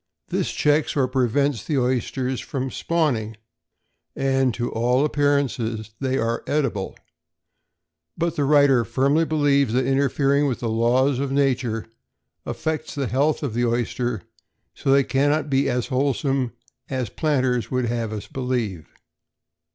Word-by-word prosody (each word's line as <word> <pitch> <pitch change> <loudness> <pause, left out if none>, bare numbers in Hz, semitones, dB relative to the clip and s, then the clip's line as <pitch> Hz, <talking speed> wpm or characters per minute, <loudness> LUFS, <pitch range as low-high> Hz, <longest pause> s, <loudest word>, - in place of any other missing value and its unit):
This - - -1
checks 150 0 +1
or 130 -2 +3
prevents 130 0 +1
the 150 - -1
oysters 130 0 -1
from 130 -1 -4
spawning, 125 -11 -1 0.8
and 135 -1 +2
to 120 0 -2
all 125 +5 +2
appearance 145 -3 +1 0.4
they 130 -1 0
are 115 -1 -1
edible; 135 -10 -1 1.2
but 170 0 -1
the 145 - 0
writer 140 -3 +5
firmly 140 +8 +2
believes 145 -5 +2
that 130 +1 +2
interfering 140 +1 +2
with 130 - -2
the 115 - -1
laws 125 +4 +2
of 140 -1 -2
nature 130 -5 0 0.6
affects 160 -1 -3
the 140 -2 -1
health 140 +6 +1
of 135 -6 -2
the 120 +1 +1
oyster, 120 -2 -1 0.6
and 135 - +3
they 140 0 +5
cannot 145 +3 +1
be 135 0 +2
as 125 -2 0
wholesome 135 -1 0 0.4
as 130 -5 -3
planters 130 -6 0
would 125 -1 0
have 115 -2 -2
us 105 -1 -5
believe. 120 - -3
135 Hz, 135 wpm, -23 LUFS, 120-140 Hz, 1.2 s, writer